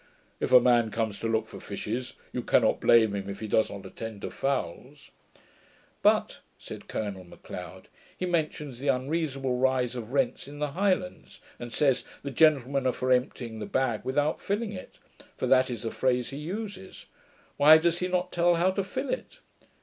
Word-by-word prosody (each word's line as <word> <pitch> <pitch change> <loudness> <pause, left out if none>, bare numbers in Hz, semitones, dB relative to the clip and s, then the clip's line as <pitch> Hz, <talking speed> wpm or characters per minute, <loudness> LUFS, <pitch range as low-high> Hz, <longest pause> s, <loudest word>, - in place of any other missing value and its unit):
If - - -2
a 125 - +10
man 120 -2 +3
comes 110 -1 -2
to 115 - -2
look 110 -1 0
for - - -10
fishes, 110 +5 -5 0.2
you - - -2
cannot - - +3
blame 110 -3 +5
him 100 -1 -4
if 100 0 -6
he 110 - -5
does 110 +1 +2
not 100 -1 -8
attend 110 -3 -8
to - - -4
fowls.' 135 - -3 0.9
'But,' - - +2 0.2
said - - -10
Colonel 100 -3 -4
M'Leod, 90 - -10 0.3
'he 185 - -2
mentions 150 -6 -2
the 140 - -5
unreasonable 135 -1 0
rise 130 -1 +1
of 120 -1 -6
rents 135 -2 0
in 145 +1 -10
the 150 -1 -2
Highlands, 185 +1 -1 0.2
and 120 -1 -7
says, 135 +1 +2 0.2
"the 140 - -4
gentlemen 140 -2 +3
are - - +3
for 130 0 -1
emptying 125 -2 0
the - - -5
bag, 125 -5 0
without 145 +4 0
filling 205 +2 -2
it"; 185 - -10 0.4
for - - -1
that 130 -1 +4
is 120 -4 -5
the 115 - -2
phrase 125 -1 0
he 135 - -6
uses. 190 +4 -6 0.5
Why 155 +2 +9
does 170 +1 +1
he 180 - 0
not 180 0 -1
tell 175 0 +3
how 175 +3 +3
to 195 +1 -1
fill 190 - -4
it?' - - -5
130 Hz, 185 wpm, -28 LUFS, 115-160 Hz, 0.9 s, a